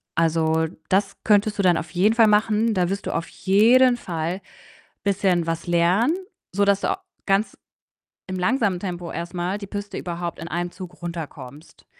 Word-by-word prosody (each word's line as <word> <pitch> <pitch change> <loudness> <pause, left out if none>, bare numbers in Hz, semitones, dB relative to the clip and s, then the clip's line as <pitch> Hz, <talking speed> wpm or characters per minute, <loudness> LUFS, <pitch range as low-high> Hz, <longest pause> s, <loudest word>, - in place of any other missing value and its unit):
also, 160 0 +2 0.2
das 195 +1 +1
könntest 210 0 +3
du - - +2
dann 175 -3 +4
auf 160 - -5
jeden 195 +5 +3
Fall 225 -2 +6
machen 215 +1 +3
da 180 -1 +1
wirst 200 +1 -3
du - - -2
auf 165 - -2
jeden 240 +6 +4
Fall 170 -1 -3 0.6
bisschen 190 -4 +1
was 165 +1 -3
lernen, 175 - +3 0.4
sodass 200 0 +2
du - - +1
a 385 0 -3 0.2
ganz 195 +2 +1 0.7
im 185 - -4
langsamen 205 -1 +1
Tempo 175 -2 -5
erst 170 +2 -5
mal 180 +2 -2
die 200 -2 -8
Piste 205 0 -5
überhaupt 170 -1 -4
in 165 - -6
einem 175 +1 -2
Zug 180 -2 -10
runterkommst. 160 -3 -8
185 Hz, 170 wpm, -23 LUFS, 170-205 Hz, 0.7 s, Fall